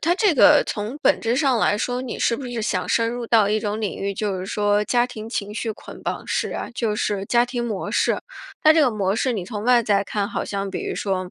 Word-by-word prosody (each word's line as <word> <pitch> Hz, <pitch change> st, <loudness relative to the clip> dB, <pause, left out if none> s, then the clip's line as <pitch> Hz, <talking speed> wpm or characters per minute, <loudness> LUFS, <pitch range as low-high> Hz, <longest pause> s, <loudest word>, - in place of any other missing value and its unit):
它 340 Hz, +2 st, +2 dB
这 395 Hz, -5 st, +2 dB
个 290 Hz, +2 st, +7 dB
从 215 Hz, +6 st, -4 dB
本 285 Hz, -, +3 dB
质 230 Hz, +2 st, 0 dB
上 270 Hz, -5 st, +2 dB
来 205 Hz, -, +2 dB
说， 250 Hz, +2 st, -2 dB
你 250 Hz, -, -5 dB
是 230 Hz, -, +1 dB
不 275 Hz, -, -7 dB
是 240 Hz, -2 st, -4 dB
想 185 Hz, -3 st, -1 dB
深 230 Hz, 0 st, +2 dB
入 240 Hz, -1 st, -5 dB
到 220 Hz, -3 st, +4 dB
一 215 Hz, +1 st, +1 dB
种 210 Hz, 0 st, -3 dB
领 210 Hz, -, -3 dB
域， 200 Hz, 0 st, -2 dB
就 205 Hz, -2 st, -2 dB
是 185 Hz, -, -5 dB
说 205 Hz, 0 st, +1 dB
家 245 Hz, +1 st, +2 dB
庭 220 Hz, -3 st, -8 dB
情 210 Hz, -3 st, -4 dB
绪 225 Hz, -1 st, -2 dB
捆 -, -, -12 dB
绑 -, -, -4 dB
式 -, -, -1 dB
啊， -, -, -5 dB
就 225 Hz, -4 st, -1 dB
是 200 Hz, -2 st, -1 dB
家 240 Hz, 0 st, +3 dB
庭 240 Hz, -1 st, -3 dB
模 210 Hz, -5 st, -3 dB
式。 -, -, +1 dB, 0.4 s
但 310 Hz, 0 st, +7 dB
这 320 Hz, -, +5 dB
个 265 Hz, -4 st, +4 dB
模 200 Hz, -2 st, 0 dB
式 255 Hz, +1 st, +1 dB
你 200 Hz, -5 st, -3 dB
从 210 Hz, +2 st, -6 dB
外 245 Hz, -1 st, +5 dB
在 200 Hz, -2 st, +1 dB
看， 205 Hz, 0 st, -2 dB
好 -, -, -3 dB
像 195 Hz, -1 st, -3 dB
比 -, -, -4 dB
如 -, -, -3 dB
说， 185 Hz, -2 st, -2 dB
220 Hz, 280 characters per minute, -22 LUFS, 205-245 Hz, 0.4 s, 个